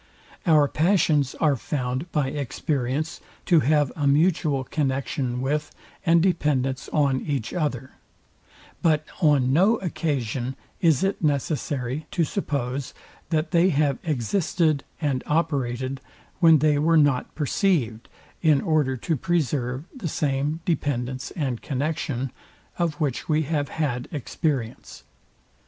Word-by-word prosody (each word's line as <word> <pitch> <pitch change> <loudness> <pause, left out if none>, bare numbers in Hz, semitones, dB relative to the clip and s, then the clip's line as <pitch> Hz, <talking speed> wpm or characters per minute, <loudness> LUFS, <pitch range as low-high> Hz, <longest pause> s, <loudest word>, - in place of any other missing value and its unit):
Our 155 -3 +5
passions 155 -4 +2
are 150 -4 +2
found 130 +5 -3
by 145 -4 +1
experience 145 +2 -2 0.2
to 170 - +5
have 145 0 +2
a 145 -3 0
mutual 150 -2 +2
connexion 130 -3 -2
with 150 +3 -1 0.3
and 165 0 +4
dependence 140 -7 0
on 140 -3 +2
each 140 -7 -3
other; 135 -7 -2 0.9
but 155 -2 +2 0.2
on 140 -5 +4
no 195 +9 +5
occasion 135 - -2 0.3
is 160 -4 +3
it 195 -2 -1
necessary 140 -1 -1
to 170 - 0
suppose, 140 -7 -3 0.3
that 160 -1 0
they 175 +1 +4
have 145 -4 +1
existed 155 - 0 0.2
and 140 -5 -1
operated, 135 -4 -1 0.4
when 165 -2 +7
they 150 -1 +3
were 165 +2 +4
not 145 -4 +2
perceived, 145 - 0 0.3
in 155 -4 +4
order 150 -6 +1
to 160 +7 -1
preserve 140 -3 -1
the 235 -10 -4
same 145 +3 -1
dependence 130 -5 -1
and 130 -8 -2
connexion, 135 -2 -2 0.5
of 170 -3 0
which 145 -2 -2
we 155 0 +2
have 145 -1 -1
had 130 -6 -2
experience. 140 -4 -3
145 Hz, 120 wpm, -24 LUFS, 130-160 Hz, 0.9 s, when